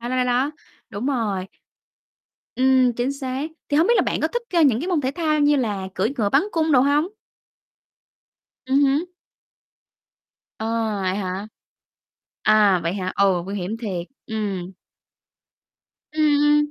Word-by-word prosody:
Đó, 240 - -5
đó, 255 - -1
đó, 250 - +2
đó. 250 +3 +1 0.4
Đúng 210 +5 -4
rồi. 215 -9 -1 1.1
Ừm, 260 -1 +4
chính 245 +4 -1
xác. 275 +2 -4 0.2
Thì 290 - +1
hông 325 +4 +4
biết 475 - +4
là - - +4
bạn - - -1
có - - +1
thích, 480 0 -3
a, 340 -2 +3
những 255 -6 +4
cái 345 - -3
môn 350 -5 +1
thể 260 -1 -1
thao 310 -3 +1
như 290 0 +4
là 205 -7 -2
cưỡi 215 +7 0
ngựa 215 -5 +1
bắn 275 - +4
cung 320 -1 +1
đồ 255 - +6
hông? 285 +4 +3 1.6
Ừm 275 +2 +3
hứm. 295 +6 0 1.5
Ờ, 220 - -3 0.4
vậy 185 0 0
hả? 190 0 -4 1.0
À, 210 -4 +4
vậy 170 +2 -1
hả? 185 -2 -3
Ồ, 190 -3 +3
nguy 195 - -5
hiểm 195 +4 -3
thiệt. 185 -7 -4 0.2
Ừm. 200 -5 -4 1.4
Ừm, 310 0 -1
ừm. 295 0 +3
255 Hz, 160 wpm, -22 LUFS, 200-290 Hz, 1.6 s, đồ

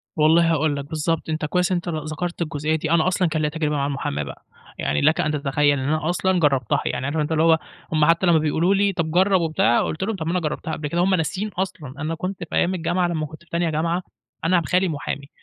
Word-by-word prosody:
والله 165 +2 +4
هاقول 150 -1 +1
لك، 140 -1 -5
بالضبط، 160 +2 -2
أنت 155 -1 -1
كويس 180 +4 0
إن - - +3
أنت 175 0 -3
ل 155 -2 -3
ذكرت 175 +3 -4
الجُزئية 155 -1 -1
دي، 155 0 -2
أنا 170 0 +3
أصلًا 185 -1 +2
كان 155 0 -1
ليّا 150 - +1
تجربة 150 -1 -1
مع 140 -1 0
المُحاماة 135 - -2
بقى، 70 - -10 0.3
يعني 75 +1 0
لَك 155 +2 +3
أن 150 - 0
تتخيّل 145 0 +1
إن 130 - -3
أنا 155 +1 0
أصلًا 185 +1 +1
جرّبتها، 135 -7 +2
يعني 125 +1 -2
عارف 145 +3 -2
أنت 150 +1 -1
اللي 160 0 +2
هو 165 -1 +5 0.3
هُم 155 -1 +4
حتّى 165 +3 +3
لمّا 170 -2 +5
بيقولوا 160 +5 +2
لي: 200 0 +2
"طب 160 -2 -2
جرّب" 185 +1 +3
وبتاع، 155 -8 +2
قُلت 160 - -3
لهم: 220 +1 -1
"طب 160 - -5
ما 165 - -1
أنا 180 - +1
جرّبتها 160 0 -3
قبل 150 -1 -3
كده." 170 +4 0
هُم 185 +1 +3
ناسيين 185 +5 -2
أصلًا، 180 -8 -4
أنا 160 +1 -2
كنت 185 +3 -4
في - - -4
أيام 185 - +2
الجامعة، 175 +1 0
لمّا 160 -3 -2
كنت 155 +3 -12
في - - -27
تانية 170 0 0
جامعة، 165 +3 -1 0.4
أنا 175 +2 +4
ب 165 - -5
خالي 185 +1 +2
محامي، 145 -2 -4
160 Hz, 255 wpm, -22 LUFS, 150-175 Hz, 0.4 s, هو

